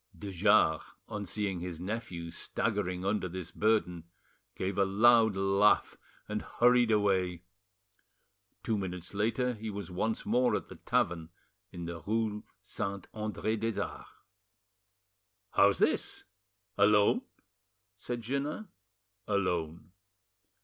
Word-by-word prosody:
De 100 Hz, +4 st, -6 dB
Jars, 95 Hz, -3 st, +3 dB
on 105 Hz, -3 st, -5 dB
seeing 100 Hz, -1 st, -2 dB
his 85 Hz, -2 st, -6 dB
nephew 90 Hz, -4 st, -5 dB
staggering 95 Hz, -4 st, -2 dB
under 100 Hz, -2 st, 0 dB
this 90 Hz, -1 st, -6 dB
burden, 95 Hz, -6 st, +1 dB, 0.5 s
gave 95 Hz, +1 st, -2 dB
a -, -, +6 dB
loud 110 Hz, +2 st, +5 dB
laugh, 100 Hz, +2 st, +3 dB, 0.3 s
and 105 Hz, 0 st, -2 dB
hurried 120 Hz, -1 st, +3 dB
away. 95 Hz, -5 st, +1 dB, 1.2 s
Two 110 Hz, -2 st, 0 dB
minutes 90 Hz, -1 st, -5 dB
later 115 Hz, +5 st, 0 dB
he 110 Hz, -1 st, -6 dB
was 100 Hz, -2 st, -6 dB
once 110 Hz, +5 st, -2 dB
more 125 Hz, 0 st, +2 dB
at -, -, -4 dB
the -, -, -9 dB
tavern 85 Hz, -2 st, 0 dB, 0.4 s
in 85 Hz, -2 st, -6 dB
the 85 Hz, -1 st, -6 dB
rue 105 Hz, +3 st, -1 dB, 0.2 s
Saint 100 Hz, -1 st, -4 dB
Andre 110 Hz, 0 st, -2 dB
des 115 Hz, 0 st, -2 dB
Arts. -, -, -6 dB, 1.3 s
"How's 100 Hz, 0 st, +4 dB
this? -, -, +1 dB, 0.6 s
Alone?" 105 Hz, -, +5 dB, 0.7 s
said 120 Hz, +4 st, -5 dB
Jeannin. 145 Hz, -, -3 dB, 0.6 s
"Alone." 90 Hz, -5 st, -1 dB
100 Hz, 115 wpm, -31 LUFS, 90-110 Hz, 1.3 s, a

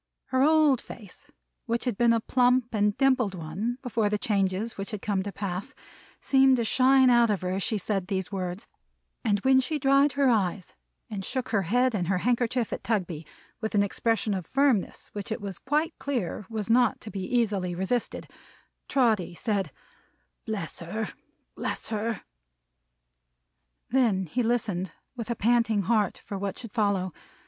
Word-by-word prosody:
Her 260 Hz, 0 st, +2 dB
old 300 Hz, -3 st, +4 dB
face, 205 Hz, -5 st, -12 dB, 0.4 s
which 235 Hz, +1 st, -1 dB
had 245 Hz, -4 st, 0 dB
been 235 Hz, +2 st, +4 dB
a 230 Hz, -, +3 dB
plump 250 Hz, +1 st, +2 dB
and 205 Hz, -1 st, +1 dB
dimpled 255 Hz, -7 st, +2 dB
one 185 Hz, +9 st, -3 dB
before 225 Hz, -4 st, 0 dB
the 210 Hz, -, 0 dB
changes 200 Hz, +1 st, 0 dB
which 195 Hz, +2 st, -5 dB
had 210 Hz, -4 st, -5 dB
come 200 Hz, -2 st, 0 dB
to 200 Hz, +1 st, -4 dB
pass, 195 Hz, -1 st, -4 dB, 0.4 s
seemed 265 Hz, -1 st, +4 dB
to 235 Hz, -, +1 dB
shine 260 Hz, +2 st, +5 dB
out 240 Hz, -1 st, +5 dB
of 205 Hz, -2 st, 0 dB
her 180 Hz, 0 st, -2 dB
as 190 Hz, +1 st, -1 dB
she 215 Hz, -, 0 dB
said 195 Hz, -1 st, -2 dB
these 190 Hz, -1 st, -2 dB
words; 185 Hz, +2 st, -4 dB, 0.6 s
and 205 Hz, -4 st, +2 dB
when 265 Hz, +2 st, +5 dB
she 300 Hz, +4 st, -1 dB
dried 275 Hz, 0 st, +4 dB
her 280 Hz, 0 st, +2 dB
eyes, 200 Hz, -6 st, 0 dB, 0.4 s
and 200 Hz, -2 st, -4 dB
shook 260 Hz, +5 st, -3 dB
her 215 Hz, -3 st, +2 dB
head 245 Hz, +7 st, +2 dB
and 180 Hz, -5 st, -1 dB
her 190 Hz, 0 st, +1 dB
handkerchief 240 Hz, +2 st, 0 dB
at -, -, -5 dB
Tugby, 180 Hz, -7 st, -2 dB, 0.3 s
with 220 Hz, -1 st, -3 dB
an 200 Hz, -, +5 dB
expression 220 Hz, +1 st, 0 dB
of 185 Hz, -3 st, -4 dB
firmness 270 Hz, -7 st, +1 dB
which 205 Hz, +1 st, -6 dB
it 220 Hz, -, -2 dB
was 195 Hz, -3 st, -6 dB
quite 300 Hz, +4 st, 0 dB
clear 235 Hz, -8 st, -3 dB
was 220 Hz, -3 st, -3 dB
not 235 Hz, 0 st, +3 dB
to 215 Hz, -, -8 dB
be 195 Hz, -, -4 dB
easily 200 Hz, -5 st, 0 dB
resisted, 190 Hz, +7 st, -2 dB, 0.6 s
Trotty 220 Hz, -10 st, +1 dB
said, 200 Hz, 0 st, -1 dB, 0.8 s
"Bless 205 Hz, -7 st, -4 dB
her! 215 Hz, +6 st, -4 dB, 0.5 s
Bless -, -, -4 dB
her!" 220 Hz, 0 st, -2 dB, 1.7 s
Then 225 Hz, -8 st, +2 dB
he 245 Hz, +10 st, -1 dB
listened, 220 Hz, -6 st, -1 dB, 0.2 s
with 235 Hz, -2 st, -6 dB
a 235 Hz, -, 0 dB
panting 225 Hz, -2 st, +2 dB
heart, 210 Hz, -2 st, 0 dB
for 200 Hz, -, -5 dB
what 200 Hz, -1 st, -3 dB
should 230 Hz, -4 st, -8 dB
follow. 200 Hz, -5 st, 0 dB
220 Hz, 170 wpm, -27 LUFS, 195-245 Hz, 1.7 s, shine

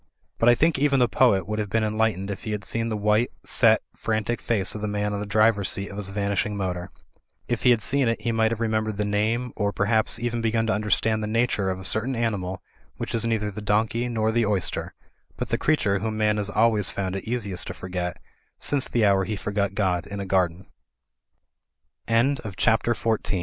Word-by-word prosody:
But 115 Hz, -, +5 dB
I 120 Hz, -, +6 dB
think 160 Hz, +2 st, +2 dB
even 140 Hz, -1 st, +3 dB
the 125 Hz, -2 st, +4 dB
poet 100 Hz, -8 st, +3 dB
would 105 Hz, +1 st, -2 dB
have 105 Hz, -1 st, -2 dB
been 110 Hz, +3 st, +1 dB
enlight 110 Hz, -1 st, +1 dB
ened 100 Hz, +2 st, -5 dB
if 100 Hz, -, -6 dB
he 110 Hz, -, -3 dB
had 105 Hz, -1 st, -4 dB
seen 115 Hz, 0 st, -1 dB
the 110 Hz, -, -2 dB
white, 105 Hz, +3 st, +2 dB
set, -, -, +4 dB
frantic 110 Hz, +1 st, -2 dB
face 100 Hz, -5 st, 0 dB
of 105 Hz, -, -6 dB
the 105 Hz, -, -2 dB
man 105 Hz, 0 st, -1 dB
on 100 Hz, -, -2 dB
the 105 Hz, -, -4 dB
driver's 105 Hz, -1 st, +3 dB
seat 100 Hz, 0 st, 0 dB
of 100 Hz, -, -8 dB
his 100 Hz, -2 st, -3 dB
vanishing 100 Hz, +1 st, -1 dB
motor. 90 Hz, -1 st, -3 dB, 0.6 s
If 120 Hz, -2 st, -1 dB
he 125 Hz, -, +4 dB
had 120 Hz, -3 st, +3 dB
seen 135 Hz, -2 st, +2 dB
it 115 Hz, -1 st, 0 dB
he 115 Hz, +2 st, -1 dB
might 110 Hz, -1 st, +2 dB
have 115 Hz, -1 st, -3 dB
remembered 110 Hz, -2 st, -1 dB
the 105 Hz, -, 0 dB
name, 110 Hz, +4 st, 0 dB
or, 100 Hz, -1 st, 0 dB
perhaps, 110 Hz, +2 st, +1 dB
even 120 Hz, 0 st, -2 dB
begun 115 Hz, 0 st, +1 dB
to 115 Hz, -, +1 dB
understand 110 Hz, +1 st, +1 dB
the 105 Hz, -, -2 dB
nature 110 Hz, -3 st, +1 dB
of 95 Hz, 0 st, -3 dB
a 95 Hz, -, -8 dB
certain 120 Hz, +7 st, 0 dB
animal 95 Hz, -6 st, -2 dB, 0.3 s
which -, -, -5 dB
is 115 Hz, 0 st, 0 dB
neither 110 Hz, -2 st, 0 dB
the 105 Hz, -, -7 dB
donkey 110 Hz, +3 st, 0 dB
nor 110 Hz, -2 st, 0 dB
the 120 Hz, +1 st, +2 dB
oyster; 105 Hz, -4 st, -1 dB, 0.4 s
but -, -, -4 dB
the -, -, 0 dB
creature 105 Hz, -11 st, +1 dB
whom 110 Hz, +1 st, -3 dB
man 105 Hz, -1 st, +2 dB
has 100 Hz, -1 st, +1 dB
always 105 Hz, -3 st, +2 dB
found 95 Hz, -1 st, -3 dB
it 95 Hz, -, -5 dB
easi 115 Hz, -4 st, -2 dB
110 Hz, 185 wpm, -25 LUFS, 100-115 Hz, 0.6 s, I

